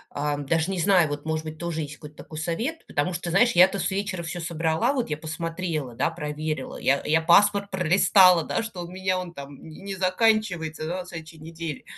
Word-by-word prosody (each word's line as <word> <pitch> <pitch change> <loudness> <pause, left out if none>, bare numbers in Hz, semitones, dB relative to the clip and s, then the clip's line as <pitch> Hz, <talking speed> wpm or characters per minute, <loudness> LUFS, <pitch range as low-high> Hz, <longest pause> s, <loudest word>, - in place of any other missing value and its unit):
а, 145 0 -1
даже 160 +4 0
не 190 - -2
знаю 175 -1 +4
вот, 145 0 -5
может 160 0 -2
быть, 155 0 -7
тоже 170 -1 -3
есть 150 0 -6
какой-то 150 0 -12
такой 155 - -10
совет. 220 - -3
Потому 145 +6 -1
что, 175 0 -4
знаешь, 235 +6 +4
я-то 185 +3 +5
с 175 - 0
вечера 195 -2 -3
всё 170 +2 -5
собрала, 165 - 0
вот 250 - -2
я 150 - -2
посмотрела, 160 -4 -4
да, 140 - 0
проверила, 150 -3 -4
я 140 +1 +1
я 160 +1 +3
паспорт 200 +4 +4
пролистала, 185 -1 +5
да, - - -1
что 220 -6 -6
у 170 - -8
меня 185 0 -1
он 180 -1 -7
там 140 -2 -9
не 160 +3 -12
не 195 0 -5
заканчивается, 185 -5 +1
да, 180 +2 -3
на - - -10
следующей 165 -2 -9
неделе. 160 -1 -7
170 Hz, 210 wpm, -25 LUFS, 155-185 Hz, -, я-то